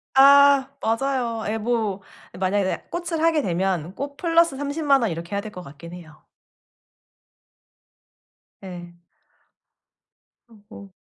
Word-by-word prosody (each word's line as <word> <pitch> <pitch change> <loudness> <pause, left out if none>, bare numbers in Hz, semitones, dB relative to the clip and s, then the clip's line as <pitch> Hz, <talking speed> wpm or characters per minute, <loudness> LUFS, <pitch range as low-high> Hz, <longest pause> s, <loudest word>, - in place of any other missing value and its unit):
아 280 0 +6
맞아요. 230 -1 -1
에 215 +1 -1
뭐 220 -3 -1 0.4
만약에 190 0 -1
꽃을 340 -2 -3
하게 325 -2 +3
되면 180 - -2
꽃 280 0 -6
플러스 335 -4 +2
300,000 285 -1 +1
원 225 -5 0
이렇게 170 +4 -6
해야 200 - -1
될 215 0 -9
것 180 - -9
같긴 150 +4 -12
해요. 165 -4 -13 2.4
예. 175 -2 -10 1.5
어 230 -2 -19
뭐. 200 -3 -12
225 Hz, 185 characters per minute, -23 LUFS, 185-280 Hz, 2.4 s, 아